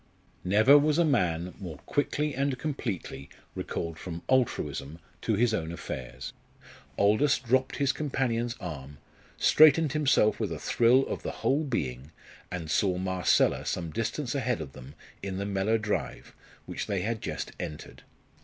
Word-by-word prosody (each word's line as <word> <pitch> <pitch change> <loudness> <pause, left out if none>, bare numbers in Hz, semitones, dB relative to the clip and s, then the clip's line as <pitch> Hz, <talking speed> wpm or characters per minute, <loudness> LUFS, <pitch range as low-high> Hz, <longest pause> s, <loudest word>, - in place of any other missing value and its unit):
Never 110 +10 +6
was 150 +1 +2
a 170 - +4
man 90 - +1
more 85 -6 -7
quickly 145 +1 0
and 135 0 0
completely 100 - -4 0.2
recalled 85 -1 -4
from 85 -2 -7
altruism 110 - 0 0.2
to 110 - +1
his 115 +2 +2
own 80 -6 -2
affairs. 65 -6 -6 0.6
Aldous 110 +9 +4
dropped 130 +1 +1
his 140 -2 +2
companion's 125 -5 -1
arm, 75 -4 -7 0.4
straightened 155 -1 +6
himself 145 -8 +3
with 105 -6 -1
a 80 - -3
thrill 120 - +3
of - - -4
the - - -4 0.2
whole 145 +4 +3
being, 70 - -3 0.4
and 85 -4 -4
saw 95 0 +2
Marcella 95 -1 +2
some 85 -3 -3
distance 120 - -2
ahead 125 -6 0
of 75 -4 -6
them 65 +3 -12 0.3
in 95 -1 -4
the 100 - -2
Mellor 100 +3 +1
drive, 110 -1 -3 0.3
which - - -5
they 100 -3 -1
had 115 +1 -2
just - - -4
entered. 75 - -7
105 Hz, 150 wpm, -28 LUFS, 85-130 Hz, 0.6 s, Never